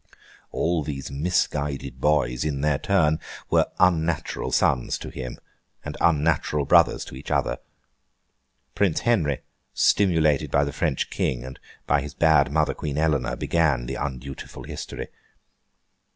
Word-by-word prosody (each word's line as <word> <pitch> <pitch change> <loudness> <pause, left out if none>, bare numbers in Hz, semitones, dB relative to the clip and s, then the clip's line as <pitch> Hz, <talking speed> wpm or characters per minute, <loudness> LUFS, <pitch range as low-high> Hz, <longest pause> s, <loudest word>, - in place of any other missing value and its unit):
All 85 0 0
these 70 -2 -5
misguided 70 -4 -1
boys, 65 -5 +2
in 70 -3 -2
their 75 -1 +1
turn, 80 -6 +2 0.3
were - - +4
unnatural 85 -3 +1
sons 65 - +1
to - - -8
him, 65 -2 -6 0.5
and 75 - -5
unnatural 75 -2 +2
brothers - - +4
to - - -10
each 70 +3 -9
other. - - 0 1.1
Prince 95 -1 +1
Henry, 85 - +1 0.3
stimulated 80 -8 +3
by 70 - +3
the 70 - -3
French 75 -7 -1
King, 60 0 -1
and 65 - -9 0.3
by 75 0 +2
his 75 -1 -8
bad 75 -5 +4
mother, 75 0 +2
Queen 75 -2 -4
Eleanor, 70 -6 +1
began 75 -7 +1
the 65 - -4
undutiful 70 -1 -6
history. - - -7
75 Hz, 135 wpm, -24 LUFS, 70-80 Hz, 1.1 s, were